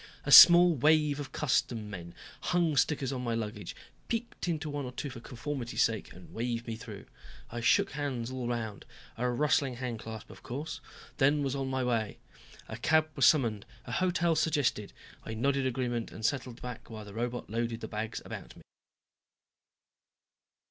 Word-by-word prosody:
A - - -1
small 175 0 +11
wave 150 +1 +3
of 140 -3 -6
custom 120 -6 0
men 85 -4 -8 0.2
hung 170 -4 +1
stickers 135 -1 +1
on 130 - -3
my 120 -2 -1
luggage, 105 -4 -5 0.3
peeked 230 -4 -3
into 160 -2 -2
one 145 -1 -3
or 125 - -5
two 135 +2 -5
for 120 - -8
conformity's 120 +1 -2
sake, 110 -2 -1
and 90 - -14
waved 120 0 -2
me 115 - -4
through. 110 - -9 0.5
I 120 +1 -4
shook 195 - +3
hands 130 -5 -3
all 125 -2 -3
around 110 -4 -4 0.3
a 125 +2 -1
rustling 135 0 +1
hand 120 -2 -4
clasp 110 0 -8
of - - -13
course 145 +6 -6 0.4
then 145 +1 +3
was 135 0 -1
on 135 -1 -2
my 130 -1 -1
way. 115 -4 -1 0.5
A 110 - -6
cab 155 +6 +2
was 135 -3 +5
summoned, 115 -9 +3 0.2
a 120 - -7
hotel 175 +1 +1
suggested. 145 -10 0 0.3
I 110 - -6
nodded 135 +3 +1
agreement 120 -2 -2
and 110 - -6
settled 125 -2 -2
back 125 -2 -7
while 110 -2 -8
the 100 - -11
robot 120 +2 -3
loaded 115 +1 -2
the 110 - -5
bags 110 +1 -4
about - - -8
me. - - -15
125 Hz, 175 wpm, -30 LUFS, 115-145 Hz, 0.5 s, small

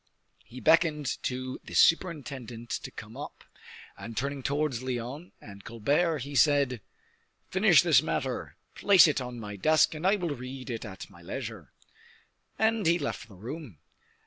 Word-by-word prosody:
He 120 +3 -11
beckoned 155 -2 +2
to 130 0 -4
the - - -9
superintendent 135 - +1
to - - -3
come - - -11
up, - - -8 0.5
and 115 0 -9
turning 140 +1 -2
towards 140 -2 -1
Lyonne 130 +6 -5
and 100 -1 -12
Colbert, 145 +8 0
he 140 +1 -8
said: 140 -4 +3 0.7
"Finish - - +5
this - - +5
matter, - - -3 0.2
place 200 -3 +6
it 145 -3 0
on 125 -1 -6
my 105 -2 -7
desk, 155 +12 +4
and 160 +4 -2
I 200 - +5
will 175 -6 -2
read 130 +1 -7
it 115 0 -5
at 95 -3 -9
my - - -16
leisure." - - -7 0.9
And 220 -3 +2
he 170 +1 +4
left 145 -6 -4
the 105 - -15
room. 120 - -8
135 Hz, 155 wpm, -28 LUFS, 120-155 Hz, 0.9 s, place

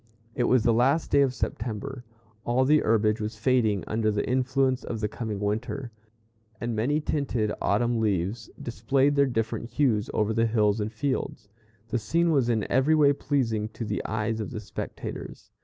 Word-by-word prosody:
It 120 - 0
was 125 -2 +3
the 115 - +4
last 135 +7 +2
day 140 - +5
of 135 -2 +3
September. 120 +1 -4 0.4
All 125 +2 +2
the 150 +3 +5
herbage 110 -2 +2
was 105 +2 -4
fading 110 -7 +2
under 110 0 0
the 105 -1 -1
influence 130 +1 +1
of 115 - -4
the 105 - 0
coming 110 -1 -5
winter, 110 +5 -3 0.7
and 120 -1 -2
many 135 +8 +1
tinted 130 -8 -1
autumn 120 +3 +1
leaves 105 +1 -1
displayed 135 +5 +1
their 140 -1 +4
different 115 -1 -2
hues 120 -8 +1
over 110 0 0
the 115 +1 +2
hills 105 -1 +2
and 105 +1 -2
fields. 125 -3 -3 0.4
The 120 - 0
scene 170 +9 +1
was 135 -6 +2
in 110 -3 +1
every 135 +5 +3
way 145 -2 +5
pleasing 115 -7 -1
to 115 - -5
the 105 0 -2
eyes 110 +1 -1
of 110 - -3
the 110 - -5
spectators. 105 - -7
115 Hz, 175 wpm, -27 LUFS, 110-130 Hz, 0.7 s, day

